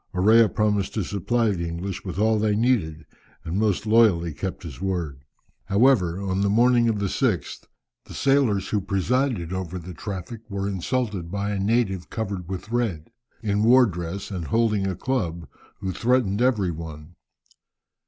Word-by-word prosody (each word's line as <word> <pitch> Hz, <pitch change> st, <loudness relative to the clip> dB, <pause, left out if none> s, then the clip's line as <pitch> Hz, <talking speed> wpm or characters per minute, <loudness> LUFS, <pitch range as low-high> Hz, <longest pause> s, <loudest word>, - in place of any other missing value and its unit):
Orea 110 Hz, +4 st, +5 dB
promised 105 Hz, -1 st, 0 dB
to 105 Hz, -, 0 dB
supply 110 Hz, +5 st, 0 dB
the 85 Hz, -3 st, -2 dB
English 85 Hz, +3 st, -5 dB
with 90 Hz, -2 st, -6 dB
all 110 Hz, +1 st, +2 dB
they 105 Hz, -1 st, +1 dB
needed 105 Hz, -10 st, 0 dB, 0.4 s
and 85 Hz, +4 st, -2 dB
most 105 Hz, -2 st, +1 dB
loyally 105 Hz, -7 st, +4 dB
kept 90 Hz, +7 st, -5 dB
his 75 Hz, -7 st, -9 dB
word. 85 Hz, -8 st, -3 dB, 0.4 s
However, 100 Hz, -5 st, +3 dB
on 95 Hz, -1 st, -1 dB
the 100 Hz, -, +2 dB
morning 120 Hz, +2 st, +4 dB
of 110 Hz, -, 0 dB
the 100 Hz, -, -1 dB
6th 95 Hz, -, -1 dB, 0.4 s
the -, -, -11 dB
sailors 135 Hz, -8 st, +2 dB
who 105 Hz, -, 0 dB
presided 100 Hz, 0 st, 0 dB
over 95 Hz, -1 st, -4 dB
the 90 Hz, +1 st, -8 dB
traffic 100 Hz, +6 st, -6 dB
were 100 Hz, -1 st, -2 dB
insulted 100 Hz, -2 st, -2 dB
by 100 Hz, +2 st, -2 dB
a 100 Hz, -, -2 dB
native 100 Hz, -3 st, 0 dB
covered 100 Hz, -6 st, -4 dB
with 95 Hz, +3 st, -6 dB
red, 110 Hz, -10 st, -2 dB, 0.3 s
in 105 Hz, -1 st, +1 dB
war 125 Hz, +3 st, +6 dB
dress, 90 Hz, 0 st, -5 dB
and 90 Hz, -4 st, -4 dB
holding 105 Hz, +2 st, +1 dB
a 95 Hz, -, -2 dB
club, 85 Hz, -, -2 dB, 0.3 s
who 95 Hz, -, -2 dB
threatened 115 Hz, 0 st, +1 dB
every 110 Hz, -8 st, +2 dB
one. 80 Hz, 0 st, -8 dB
100 Hz, 165 wpm, -24 LUFS, 90-110 Hz, 0.4 s, war